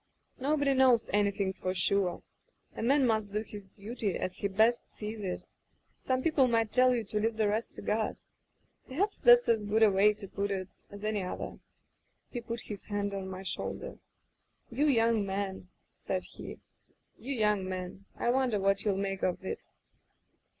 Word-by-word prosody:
Nobody 285 Hz, +1 st, +2 dB
knows 255 Hz, -3 st, +4 dB
anything 200 Hz, -1 st, +1 dB
for 185 Hz, 0 st, -3 dB
sure. 180 Hz, -1 st, +1 dB, 0.5 s
A -, -, -5 dB
man 270 Hz, +4 st, +4 dB
must 220 Hz, -3 st, +1 dB
do 210 Hz, +1 st, -1 dB
his 205 Hz, -3 st, -11 dB
duty 210 Hz, -2 st, -3 dB
as 185 Hz, -, -3 dB
he 200 Hz, -, 0 dB
best 220 Hz, +5 st, +3 dB
sees 215 Hz, +1 st, -6 dB
it. 190 Hz, -3 st, -3 dB, 0.5 s
Some 260 Hz, 0 st, -1 dB
peo 330 Hz, -, +2 dB
ple 270 Hz, -4 st, +4 dB
might 225 Hz, -2 st, +1 dB
tell 255 Hz, +1 st, +5 dB
you 235 Hz, -, -1 dB
to 210 Hz, +1 st, -2 dB
leave 220 Hz, +1 st, 0 dB
the 215 Hz, -1 st, +2 dB
rest 215 Hz, +3 st, -1 dB
to -, -, -6 dB
God. 215 Hz, +1 st, 0 dB, 0.7 s
Perhaps 390 Hz, +10 st, -1 dB
that's 485 Hz, 0 st, +7 dB
as 225 Hz, -2 st, +3 dB
good 215 Hz, +2 st, +2 dB
a 215 Hz, -, +7 dB
way 205 Hz, +2 st, +4 dB
to 205 Hz, -1 st, -7 dB
put 200 Hz, +1 st, -2 dB
it 190 Hz, -2 st, -3 dB, 0.2 s
as 200 Hz, 0 st, -10 dB
any 215 Hz, -1 st, 0 dB
other.' 180 Hz, -, -5 dB, 0.7 s
He 240 Hz, -, -4 dB
put 230 Hz, -1 st, -5 dB
his 205 Hz, -2 st, -8 dB
hand 205 Hz, -1 st, -2 dB
on 190 Hz, -1 st, -4 dB
my 190 Hz, 0 st, -6 dB
shoulder. 185 Hz, -, -4 dB, 0.7 s
'You 285 Hz, +6 st, +2 dB
young 230 Hz, -5 st, +3 dB
men,' 195 Hz, -2 st, -3 dB, 0.2 s
said -, -, -3 dB
he, -, -, -9 dB, 0.6 s
'you 270 Hz, +3 st, -4 dB
young 210 Hz, -4 st, +1 dB
men 185 Hz, +1 st, -6 dB
— -, -, -37 dB
I 240 Hz, -, +1 dB
wonder 250 Hz, -5 st, +1 dB
what 195 Hz, 0 st, +2 dB
you'll 200 Hz, -3 st, +1 dB
make 195 Hz, -1 st, -2 dB
of 185 Hz, +1 st, -1 dB
it.' -, -, -5 dB
210 Hz, 185 wpm, -31 LUFS, 195-235 Hz, 0.7 s, that's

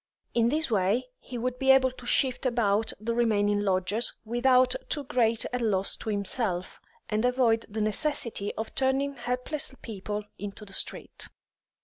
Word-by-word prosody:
In 235 Hz, -1 st, +3 dB
this 305 Hz, -1 st, 0 dB
way 215 Hz, +5 st, +1 dB
he 250 Hz, -, -8 dB
would 250 Hz, +1 st, -3 dB
be 270 Hz, -1 st, +1 dB
able 265 Hz, -1 st, +6 dB
to 250 Hz, -1 st, -12 dB
shift 260 Hz, 0 st, +1 dB
about 225 Hz, -3 st, +1 dB
the 230 Hz, +2 st, -2 dB
remaining 205 Hz, -3 st, +2 dB
lodgers 200 Hz, +3 st, +1 dB
without 250 Hz, +2 st, +3 dB, 0.2 s
too 290 Hz, -, 0 dB
great 235 Hz, -5 st, +1 dB
a 250 Hz, -, 0 dB
loss 200 Hz, -5 st, +2 dB
to -, -, -6 dB
himself, 200 Hz, -2 st, -2 dB, 0.3 s
and 215 Hz, +1 st, 0 dB
avoid 245 Hz, -3 st, +2 dB
the 215 Hz, +1 st, -3 dB
necessity 215 Hz, -2 st, +1 dB
of 220 Hz, +1 st, -5 dB
turning 270 Hz, +1 st, +1 dB
helpless 250 Hz, +3 st, -4 dB
people 210 Hz, -1 st, -5 dB, 0.2 s
into 205 Hz, +1 st, -6 dB
the 195 Hz, -, -12 dB
street. -, -, -1 dB
235 Hz, 155 wpm, -28 LUFS, 210-255 Hz, 0.3 s, able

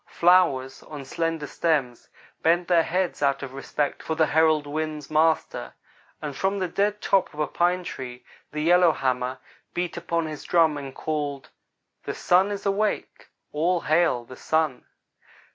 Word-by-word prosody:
Flowers, 170 Hz, -7 st, +3 dB
on 145 Hz, -3 st, -9 dB
slender 165 Hz, +1 st, -2 dB
stems, 140 Hz, -6 st, -1 dB, 0.3 s
bent 170 Hz, +2 st, +2 dB
their 175 Hz, -2 st, +5 dB
heads 180 Hz, +1 st, -1 dB
out 140 Hz, -1 st, +1 dB
of 135 Hz, -1 st, -7 dB
respect 140 Hz, +1 st, -2 dB
for 160 Hz, -, -3 dB
the 160 Hz, 0 st, +4 dB
herald 155 Hz, -1 st, +3 dB
wind's 155 Hz, 0 st, -4 dB
Master, 155 Hz, -, +1 dB, 0.5 s
and 145 Hz, -2 st, -4 dB
from 195 Hz, +5 st, 0 dB
the 185 Hz, -2 st, -1 dB
dead 205 Hz, +4 st, 0 dB
top 195 Hz, -1 st, +2 dB
of -, -, -10 dB
a 150 Hz, -, +2 dB
pine 180 Hz, +3 st, +1 dB
tree 125 Hz, -6 st, -7 dB, 0.3 s
the 150 Hz, -, -3 dB
Yellowhammer 135 Hz, -7 st, +2 dB, 0.4 s
beat 175 Hz, -1 st, -2 dB
upon 170 Hz, -1 st, -1 dB
his 155 Hz, -2 st, -6 dB
drum 165 Hz, -3 st, +3 dB
and 140 Hz, -2 st, -7 dB
called 145 Hz, -3 st, -3 dB, 0.5 s
'the -, -, -3 dB
Sun 185 Hz, +3 st, +3 dB
is 205 Hz, 0 st, -5 dB
awake 200 Hz, +2 st, -1 dB, 0.2 s
all 170 Hz, +3 st, +1 dB
hail 155 Hz, -6 st, +2 dB
the 130 Hz, -, -11 dB
Sun!' 155 Hz, -5 st, 0 dB
155 Hz, 155 wpm, -25 LUFS, 140-175 Hz, 0.5 s, their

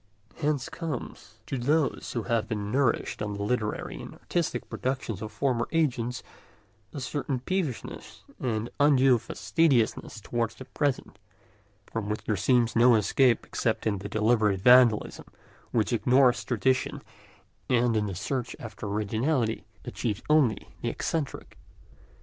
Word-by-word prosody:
Hence 145 Hz, -4 st, 0 dB
comes, 145 Hz, -, -6 dB
to 135 Hz, -, -3 dB
those 145 Hz, +4 st, 0 dB
who 115 Hz, -, -2 dB
have 115 Hz, +1 st, 0 dB
been 105 Hz, -2 st, -3 dB
nourished 130 Hz, -5 st, 0 dB
on 105 Hz, -1 st, -2 dB
the 100 Hz, -, -4 dB
literary 110 Hz, -1 st, -2 dB
and -, -, -9 dB
artistic 165 Hz, -8 st, -2 dB
productions 130 Hz, -6 st, -3 dB
of 110 Hz, 0 st, -5 dB
former 120 Hz, +1 st, 0 dB
ages, 125 Hz, -7 st, 0 dB, 0.7 s
a -, -, -6 dB
certain 135 Hz, 0 st, -2 dB
peevishness 160 Hz, -3 st, -4 dB, 0.2 s
and 115 Hz, -2 st, -2 dB
undue 135 Hz, -4 st, +5 dB
fastidiousness 130 Hz, -6 st, 0 dB
towards 115 Hz, +1 st, -2 dB
the 130 Hz, -, -10 dB
present, 135 Hz, +1 st, -2 dB, 0.7 s
from 110 Hz, -2 st, -4 dB
which 105 Hz, -, -3 dB
there 105 Hz, -, 0 dB
seems 120 Hz, +4 st, +2 dB
no 120 Hz, +1 st, +6 dB
escape 115 Hz, +3 st, +3 dB
except -, -, -1 dB
into 100 Hz, -3 st, 0 dB
the 100 Hz, -, -6 dB
deliberate 105 Hz, -2 st, +2 dB
vandalism 125 Hz, -2 st, +5 dB, 0.4 s
which 115 Hz, +1 st, 0 dB
ignores 125 Hz, +2 st, +4 dB
tradition 130 Hz, +2 st, 0 dB, 0.7 s
and 120 Hz, -2 st, +3 dB
in 105 Hz, -1 st, +1 dB
the 95 Hz, -, -4 dB
search 125 Hz, +6 st, -3 dB
after 110 Hz, -2 st, -7 dB
originality 110 Hz, +4 st, -1 dB, 0.2 s
achieves 105 Hz, -4 st, -3 dB
only 145 Hz, -8 st, +3 dB
the -, -, -1 dB
eccentric. 155 Hz, -4 st, -4 dB
120 Hz, 135 wpm, -27 LUFS, 110-135 Hz, 0.7 s, no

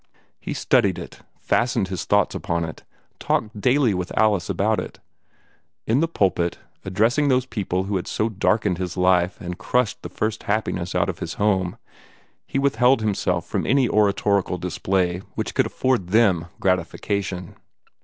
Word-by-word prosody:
He -, -, -5 dB
studied -, -, +2 dB
it, -, -, -9 dB, 0.2 s
fastened 115 Hz, -5 st, +1 dB
his 95 Hz, -3 st, -4 dB
thoughts -, -, +2 dB
upon 85 Hz, 0 st, -2 dB
it, 80 Hz, -, -9 dB, 0.4 s
talked 105 Hz, -1 st, -1 dB
daily 130 Hz, -2 st, +3 dB
with 90 Hz, -1 st, -3 dB
Alice 105 Hz, -5 st, +2 dB
about 110 Hz, +2 st, +1 dB
it. -, -, -7 dB, 0.9 s
In 115 Hz, +4 st, +2 dB
the 165 Hz, -, +2 dB
pulpit, 95 Hz, -, 0 dB, 0.3 s
addressing 115 Hz, +10 st, +2 dB
those 130 Hz, -2 st, +2 dB
people 95 Hz, -6 st, -2 dB
who 100 Hz, 0 st, -1 dB
had 90 Hz, -, -5 dB
so 110 Hz, -, 0 dB
darkened 105 Hz, -3 st, 0 dB
his 90 Hz, 0 st, -4 dB
life 90 Hz, 0 st, +2 dB
and 90 Hz, 0 st, -6 dB
crushed 125 Hz, -3 st, 0 dB
the -, -, -7 dB
first 110 Hz, 0 st, -2 dB
happiness 95 Hz, -4 st, -1 dB
out 90 Hz, -1 st, +2 dB
of 85 Hz, -, -5 dB
his 80 Hz, -, -5 dB
home, 95 Hz, -4 st, 0 dB, 0.7 s
he -, -, -3 dB
withheld 135 Hz, -2 st, +3 dB
himself 90 Hz, -5 st, 0 dB
from -, -, -2 dB
any 135 Hz, -1 st, +3 dB
oratorical 100 Hz, -3 st, +2 dB
display 90 Hz, 0 st, -1 dB, 0.2 s
which -, -, -3 dB
could -, -, +2 dB
afford 125 Hz, -9 st, 0 dB
them 95 Hz, -5 st, +3 dB
gratification. 90 Hz, 0 st, -2 dB
100 Hz, 155 wpm, -23 LUFS, 90-110 Hz, 0.9 s, daily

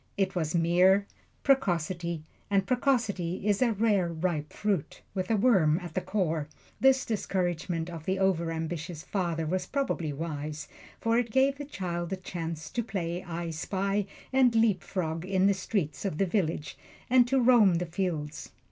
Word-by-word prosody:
It 195 Hz, -1 st, +1 dB
was 160 Hz, -2 st, -1 dB
mere 180 Hz, +4 st, +4 dB, 0.4 s
precocity, 175 Hz, -, +1 dB, 0.3 s
and 195 Hz, -1 st, +2 dB
precocity 215 Hz, -8 st, 0 dB
is 205 Hz, +1 st, +2 dB
a 245 Hz, -2 st, +4 dB
rareripe 175 Hz, -7 st, 0 dB
fruit, 200 Hz, -8 st, -2 dB
with 185 Hz, -2 st, -2 dB
a 225 Hz, -, +3 dB
worm 190 Hz, -9 st, +4 dB
at 175 Hz, -4 st, -8 dB
the 185 Hz, -, 0 dB
core. 165 Hz, -8 st, -1 dB, 0.3 s
This 265 Hz, 0 st, +4 dB
discouragement 175 Hz, -6 st, -1 dB
of 165 Hz, -3 st, -8 dB
the 190 Hz, +1 st, 0 dB
over 180 Hz, -4 st, +1 dB
ambitious 165 Hz, 0 st, -4 dB
father 170 Hz, -5 st, -1 dB
was 180 Hz, +3 st, -1 dB
probably 260 Hz, -, -1 dB
wise, 150 Hz, 0 st, -5 dB, 0.3 s
for 230 Hz, +1 st, +2 dB
it 240 Hz, -1 st, -1 dB
gave 270 Hz, +3 st, +2 dB
the 290 Hz, -, -4 dB
boy 175 Hz, -9 st, -3 dB
a 190 Hz, -, -1 dB
chance 165 Hz, -4 st, -6 dB
to 240 Hz, -, -1 dB
play 180 Hz, -5 st, -3 dB
I 170 Hz, -1 st, -4 dB
Spy 195 Hz, +5 st, -1 dB, 0.3 s
and 255 Hz, -3 st, +4 dB
leapfrog 185 Hz, -6 st, +1 dB
in 190 Hz, 0 st, +1 dB
the 200 Hz, -, +5 dB
streets 190 Hz, -4 st, -2 dB
of 190 Hz, -7 st, -2 dB
the 195 Hz, -, +2 dB
village, 170 Hz, -5 st, -1 dB, 0.3 s
and 245 Hz, -1 st, +5 dB
to 270 Hz, +1 st, +2 dB
roam 235 Hz, -7 st, +6 dB
the 175 Hz, +1 st, 0 dB
fields. 165 Hz, -4 st, -3 dB
185 Hz, 160 wpm, -29 LUFS, 165-210 Hz, 0.4 s, roam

